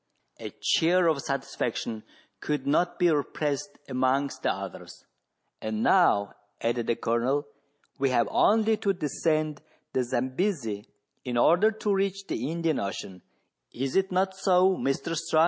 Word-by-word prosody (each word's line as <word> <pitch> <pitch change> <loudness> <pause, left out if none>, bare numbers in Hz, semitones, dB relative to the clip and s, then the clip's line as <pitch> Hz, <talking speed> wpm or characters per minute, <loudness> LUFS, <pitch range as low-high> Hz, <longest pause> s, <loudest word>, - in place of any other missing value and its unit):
A - - -6
cheer 175 +2 +2
of 155 -4 +2
satisfaction 120 -5 -3 0.4
could 150 -1 -2
not 175 +5 +1
be 175 -2 +4
repressed 150 +4 -2
amongst 130 +2 0
the - - +1
others. - - -8 0.3
" - - -50
And 110 0 -2
now," 105 - +4 0.3
added 120 0 -1
the 115 - +2
Colonel, 125 +7 0 0.3
" 145 - -40
we 135 0 +2
have 120 -2 +2
only 220 +1 +3
to 200 -2 +1
descend 155 -2 -1 0.3
the 130 - +1
Zambesi 130 - -2 0.4
in 125 -1 -2
order 175 - +5
to 215 -1 -1
reach 195 0 -1
the 130 -4 -3
Indian 165 -2 0
Ocean: 95 -2 -5 0.5
is 130 +2 -2
it 190 0 +2
not 190 +1 +1
so, 190 -1 +3
Mr 135 +3 -1
Strux.?" 160 0 +1
150 Hz, 145 wpm, -27 LUFS, 125-185 Hz, 0.5 s, order